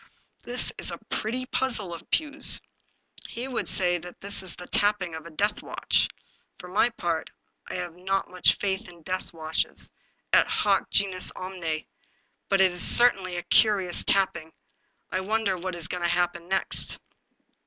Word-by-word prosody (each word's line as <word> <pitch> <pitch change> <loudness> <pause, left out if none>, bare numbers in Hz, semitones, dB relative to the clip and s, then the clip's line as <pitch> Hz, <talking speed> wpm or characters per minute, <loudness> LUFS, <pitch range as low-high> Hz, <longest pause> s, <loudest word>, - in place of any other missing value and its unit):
" - - -41
This 245 +1 0
is - - +2
a - - -4
pretty 250 +4 -2
puzzle 230 -9 -1
of 165 - -11
Pugh's. 305 -2 +2 0.7
He 245 +3 -5
would 255 -3 -3
say 175 -2 +2
that 175 +1 -11
that 200 0 -3
is 185 -2 -7
the 180 - -10
tapping 205 -4 +1
of 160 0 -8
a - - -10
deathwatch. 205 +6 0 0.5
For 180 - -11
my 200 +6 +2
part 170 -8 -3 0.4
I - - -5
have 175 -2 -5
not 190 +2 -2
much 180 0 +2
faith 195 0 -2
in 170 -2 -18
deathwatches, 165 -3 -2 0.4
et - - +6
hoc - - +1
genus 190 -2 +3
omne, 175 -4 -4 0.6
but 195 -1 +3
it 185 -2 +3
certainly 195 -5 +7
is 175 - -3
a - - -2
curious 195 -5 +4
tapping; 170 -5 0 0.6
I 185 - 0
wonder 205 0 0
what 185 0 -5
is 165 -1 -2
going 180 -1 -5
to 175 - +1
happen 175 -1 -1
next 190 +1 0
185 Hz, 165 wpm, -26 LUFS, 175-205 Hz, 0.7 s, certainly